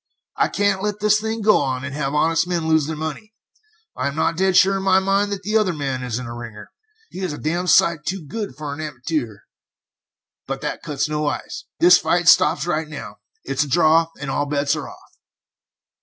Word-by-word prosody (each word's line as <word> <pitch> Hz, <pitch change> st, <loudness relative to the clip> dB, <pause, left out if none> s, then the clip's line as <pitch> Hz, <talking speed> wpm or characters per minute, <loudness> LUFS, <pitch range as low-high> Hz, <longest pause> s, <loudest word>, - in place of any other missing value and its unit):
I -, -, +2 dB
can't 200 Hz, -1 st, 0 dB
let 210 Hz, 0 st, -2 dB
this 210 Hz, 0 st, +3 dB
thing 220 Hz, 0 st, -3 dB
go 210 Hz, 0 st, +5 dB
on, 130 Hz, -2 st, -2 dB
and 140 Hz, -, -6 dB
have 140 Hz, 0 st, -2 dB
honest 165 Hz, +2 st, +2 dB
men 170 Hz, -3 st, -1 dB
lose 160 Hz, -2 st, +2 dB
their 160 Hz, -, -3 dB
money. 160 Hz, +8 st, -6 dB, 0.6 s
I -, -, -2 dB
am 140 Hz, -, -4 dB
not 165 Hz, -, 0 dB
dead 190 Hz, +1 st, +2 dB
sure 195 Hz, +1 st, +5 dB
in -, -, -4 dB
my 190 Hz, -1 st, +3 dB
mind 195 Hz, +2 st, +1 dB
that 200 Hz, -, -4 dB
the 210 Hz, +3 st, -2 dB
other 210 Hz, -5 st, +3 dB
man 135 Hz, -4 st, -3 dB
isn't 125 Hz, 0 st, -4 dB
a 115 Hz, -, -7 dB
ringer; 115 Hz, -3 st, -9 dB, 0.4 s
he -, -, -8 dB
is 185 Hz, -5 st, -3 dB
a -, -, -6 dB
damned 175 Hz, +4 st, -2 dB
sight 160 Hz, -1 st, +4 dB
too 185 Hz, -1 st, -4 dB
good 205 Hz, -, -5 dB
for 150 Hz, -1 st, -5 dB
an 145 Hz, -, -9 dB
amatoor; 135 Hz, -7 st, -4 dB, 1.1 s
but -, -, -4 dB
that -, -, -4 dB
cuts 145 Hz, 0 st, -2 dB
no 150 Hz, 0 st, -2 dB
ice. 145 Hz, -, -4 dB
This 180 Hz, +1 st, +7 dB
fight 175 Hz, -1 st, 0 dB
stops 150 Hz, -, +5 dB
right 160 Hz, -2 st, -1 dB
now. 150 Hz, -2 st, -9 dB, 0.3 s
It's 135 Hz, +2 st, 0 dB
a -, -, -6 dB
draw, 160 Hz, +2 st, +4 dB
and 140 Hz, -2 st, -4 dB
all 145 Hz, +2 st, -1 dB
bets 140 Hz, 0 st, 0 dB
are -, -, -6 dB
off." -, -, -17 dB
160 Hz, 215 wpm, -21 LUFS, 145-190 Hz, 1.1 s, This